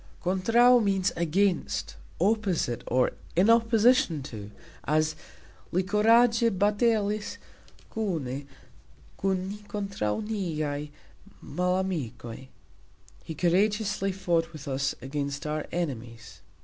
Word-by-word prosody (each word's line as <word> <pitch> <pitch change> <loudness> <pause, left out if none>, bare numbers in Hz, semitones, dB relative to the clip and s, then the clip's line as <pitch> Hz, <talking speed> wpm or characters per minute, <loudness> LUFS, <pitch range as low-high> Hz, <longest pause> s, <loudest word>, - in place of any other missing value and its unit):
"Kontraux" 230 +7 +4
means 195 -1 +1
"against, 170 - 0 0.2
opposite", 190 - +1
or 125 +1 +2 0.2
"in 190 +6 +5
opposition 225 - +3
to" 110 -7 -8 0.3
as 155 +1 +1 0.6
"Li 185 +2 +1
kuragxe 230 +4 +4
batalis 210 +1 +1 0.6
kune 145 - -3 0.7
kun 190 -1 -1
ni 205 - -6
kontraux 200 - -2
niaj 155 -8 -2 0.6
malamikoj", 180 -10 -2 0.8
He 160 - -7
courageously 195 +4 +1
fought 170 -3 0
with 155 -2 -10
us 135 0 -1
against 140 +1 -3
our 150 0 -3
enemies. 115 - -5
180 Hz, 95 wpm, -27 LUFS, 145-210 Hz, 0.8 s, in